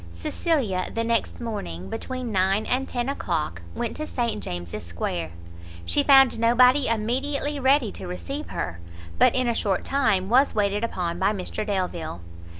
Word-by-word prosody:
Cecilia 190 - -1
the 230 - -1
next 230 0 0
morning, 95 - -5
between 255 - -4
nine 195 +2 +2
and 260 +2 -1
ten 245 0 -2
o'clock, 155 - -2
went 235 - -3
to 310 - -4
St 235 -4 -2
James' 85 -1 -5
Square; 85 -1 -3 0.6
she 290 - +2
found 270 -4 +6
nobody 250 +4 +5
immediately 270 +6 0
ready 265 -4 +3
to - - -8
receive 275 +12 -5
her, 85 -2 -4 0.4
but - - +5
in 255 -1 +2
a 235 - +2
short 200 -4 -1
time 220 -9 +2
was 260 +6 +3
waited 205 0 +1
upon 175 -6 -2
by 195 +2 +2
Mr 195 +1 -3
Delvile. 180 - -3
225 Hz, 155 wpm, -25 LUFS, 185-255 Hz, 0.6 s, found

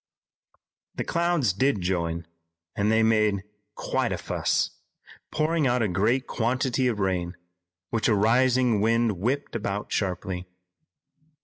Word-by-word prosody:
The - - -2
clouds 170 - +1
did 130 +2 +1
join, 85 -2 -1 0.5
and 105 +1 +1
they 110 0 +4
made 105 -3 +2 0.3
quite - - -1
a - - -1
"fuss," - - 0 0.6
pouring 155 -1 +1
out 125 -1 +2
a - - +2
great 110 +8 +1
quantity 130 +2 0
of 115 -4 -1
rain, 90 -2 -1 0.5
which 115 -2 +1
a 110 - +3
rising 120 +1 +3
wind 115 -3 +2
whipped 130 +8 -2
about 105 -2 -3
sharply. 90 -1 -2
110 Hz, 125 wpm, -26 LUFS, 100-130 Hz, 0.6 s, they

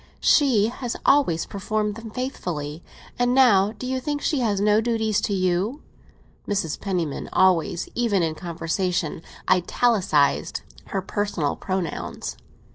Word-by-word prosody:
"She 255 -9 +4
has 245 0 -4
always 225 - +3
performed 210 +1 -2
them 225 +1 -8
faithfully; 175 - -4 0.4
and 245 +1 +2
now, 210 -7 +5
do 230 +3 -8
you 260 +1 -1
think 290 +2 -2
she 290 -1 0
has 210 -5 +1
no 210 +1 +4
duties 220 -2 0
to - - -2
you?" 185 - 0 0.6
Mrs. 195 -7 -1
Penniman 175 -7 -2
always, 180 -2 +2
even 215 -7 +1
in 160 -1 0
conversation, 170 0 -2 0.3
italicised 180 -6 +2 0.2
her 195 -1 -3
personal 195 -7 -1
pronouns. 185 -3 -4
200 Hz, 125 wpm, -24 LUFS, 175-235 Hz, 0.6 s, now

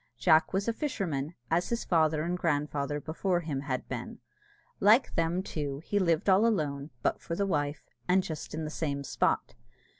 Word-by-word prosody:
Jack 155 +5 +4
was 195 +2 -1
a 230 - +2
fisherman, 175 - -2 0.2
as 170 +2 +2
his 235 0 -1
father 155 -3 +2
and 175 +2 -1
grandfather 145 -3 -1
before 175 +4 -1
him 150 -5 -3
had 130 -3 -3
been. - - -5 0.6
Like 220 +6 +5
them, 165 +3 0
too, 145 -4 -4
he 205 - +1
lived 170 -3 +1
all 195 +4 +5
alone 150 -9 -1
(but - - 0
for 170 - -4
the 200 - 0
wife), 145 -5 -1 0.2
and 185 +1 +4
just 155 -2 -6
in 160 - -3
the 155 - -4
same 140 -3 -2
spot. - - 0
160 Hz, 180 wpm, -30 LUFS, 145-185 Hz, 0.6 s, Like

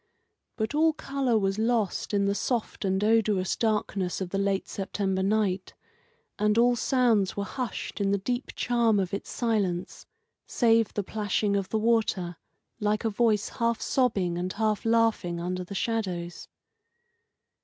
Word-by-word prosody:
But 220 +4 -2
all 315 +1 +3
colour 275 -5 0
was 195 0 0
lost 225 -3 0
in 200 -1 +2
the 200 - +2
soft 230 +2 -2
and 190 +1 +1
odorous 210 -4 +2
darkness 210 -4 -1
of 185 -2 -4
the 195 - -1
late 195 -1 0
September 195 -1 -2
night, 195 -2 0 0.6
and 210 +1 +2
all 240 +1 +5
sounds 235 -6 +2
were 200 - 0
hushed 240 -1 -5
in 195 - +1
the 200 - +2
deep 245 +6 -3
charm 235 -4 +2
of 190 -1 -2
its 200 - -4
silence, 200 -7 -2 0.4
save 230 -2 +3
the 205 - 0
plashing 205 0 -1
of 195 -2 -1
the 220 - 0
water, 215 -6 +1 0.4
like 210 0 0
a 225 - +1
voice 210 -1 +1
half 235 -2 -1
sobbing 195 -9 0
and 185 +1 -3
half 215 0 0
laughing 225 -7 +2
under 180 +1 -3
the 200 +3 -8
shadows. 185 -6 -3
210 Hz, 155 wpm, -27 LUFS, 195-230 Hz, 0.6 s, all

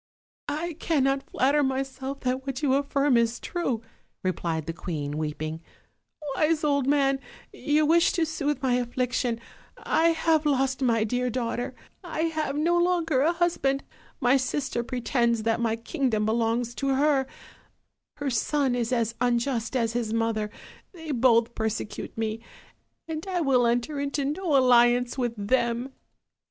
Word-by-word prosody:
"I 320 +4 -2
cannot 275 -3 +1
flatter 280 +3 +2
myself 270 0 -3
that 260 +1 -2
what 270 +2 -4
you 270 -3 +3
affirm 280 -1 +2
is 235 0 +1
true,'* 260 -11 -2 0.4
replied 170 -4 -2
the 165 - -4
queen, 150 -4 -4
weeping; 155 +1 -4 0.7
"wise 310 +1 +2
old 280 -3 +2
man, 275 -1 +3 0.3
you 300 +1 +1
wish 335 +3 +4
to 335 - +1
soothe 295 -3 -2
my 255 -2 +2
affliction: 245 -1 -1 0.4
I 325 - +2
have 320 -2 +2
lost 270 -1 +1
my 230 -4 +2
dear 250 +3 -1
daughter, 240 0 -3 0.3
I 330 -3 -3
have 315 -3 -1
no 340 +4 +2
longer 335 -6 +2
a 315 +4 +4
husband, 335 -6 0 0.4
my 250 +2 +4
sister 260 -2 -2
pretends 235 -2 0
that 225 0 +1
my 230 -1 +1
kingdom 230 -3 -1
belongs 230 +2 0
to 275 -1 +1
her; 275 -1 +2 0.9
her 285 -2 -3
son 265 +3 +1
is 240 -1 -1
as 230 -2 +1
unjust 240 0 0
as 230 -3 +1
his 235 -2 -2
mother, 225 -2 0 0.4
they 320 -3 -7
both 235 -2 +3
persecute 220 -1 -4
me, 220 0 -2 0.7
and 320 +2 -5
I 365 -2 -1
will 255 -5 +3
enter 245 +5 0
into 280 0 -1
no 305 +1 +1
alliance 245 -1 +4
with 240 -2 -1
them." 235 +4 0
260 Hz, 145 wpm, -26 LUFS, 235-290 Hz, 0.9 s, wish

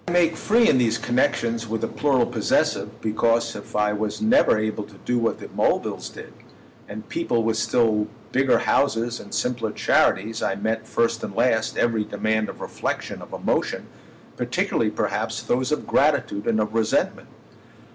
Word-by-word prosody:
I - - -2
make 170 -2 +3
free 230 +2 +3
in 130 - +4
these 115 -2 +2
connexions 115 -1 0
with 110 0 -3
the - - 0
plural 135 -5 +1
possessive 115 -3 0
because 115 +1 +1
if 105 - -9
I 105 0 +2
was 105 0 -3
never 220 - +4
able 110 0 -2
to 105 - -17
do 125 0 +1
what 115 -1 0
the - - -8
Mulvilles - - -1
did, - - -11 0.6
and 105 +1 -8
people 115 -1 0
with 110 0 0
still 110 -1 +2 0.2
bigger 135 +1 +3
houses 120 -3 +1
and 100 - -12
simpler 120 -3 -1
charities, 110 +1 +1
I 95 - 0
met, 110 +2 -2
first 115 -1 0
and 100 - -5
last, 110 -3 +1
every 115 -2 +1
demand 110 +1 -1
of - - -9
reflexion, - - -4
of - - -11
emotion—particularly - - -2
perhaps - - -2
those 130 +3 0
of 150 - -1
gratitude 140 -8 +1
and 110 -1 +2
of 105 0 -1
resentment. 110 -1 0
115 Hz, 165 wpm, -23 LUFS, 110-125 Hz, 0.6 s, in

